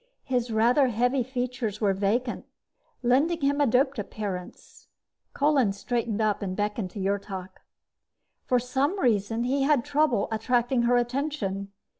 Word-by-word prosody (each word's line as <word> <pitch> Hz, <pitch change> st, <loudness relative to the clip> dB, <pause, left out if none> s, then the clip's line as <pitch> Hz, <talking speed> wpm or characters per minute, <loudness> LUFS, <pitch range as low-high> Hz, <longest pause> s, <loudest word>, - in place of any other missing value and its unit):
His 250 Hz, -2 st, -1 dB
rather 240 Hz, +5 st, +3 dB
heavy 245 Hz, +3 st, +1 dB
features 250 Hz, -3 st, -3 dB
were 205 Hz, -3 st, +2 dB
vacant, 215 Hz, +6 st, -1 dB, 0.6 s
lending 285 Hz, +8 st, +2 dB
him 285 Hz, +1 st, +1 dB
a 285 Hz, -, +4 dB
doped 260 Hz, +2 st, +2 dB
appearance. 200 Hz, -3 st, -7 dB, 0.5 s
Kolin 280 Hz, -8 st, +3 dB
straightened 225 Hz, +1 st, -2 dB
up 210 Hz, -2 st, +1 dB
and 185 Hz, -2 st, -3 dB
beckoned 210 Hz, -1 st, -2 dB
to 205 Hz, -, -8 dB
Yrtok. 195 Hz, -1 st, -3 dB, 0.9 s
For 250 Hz, -, +2 dB
some 265 Hz, +9 st, 0 dB
reason, 225 Hz, -, +1 dB
he 270 Hz, +3 st, 0 dB
had 275 Hz, -3 st, +2 dB
trouble 290 Hz, -8 st, +2 dB
attracting 240 Hz, +3 st, +1 dB
her 245 Hz, -, +4 dB
attention. 240 Hz, -6 st, -2 dB
240 Hz, 135 wpm, -26 LUFS, 210-265 Hz, 0.9 s, a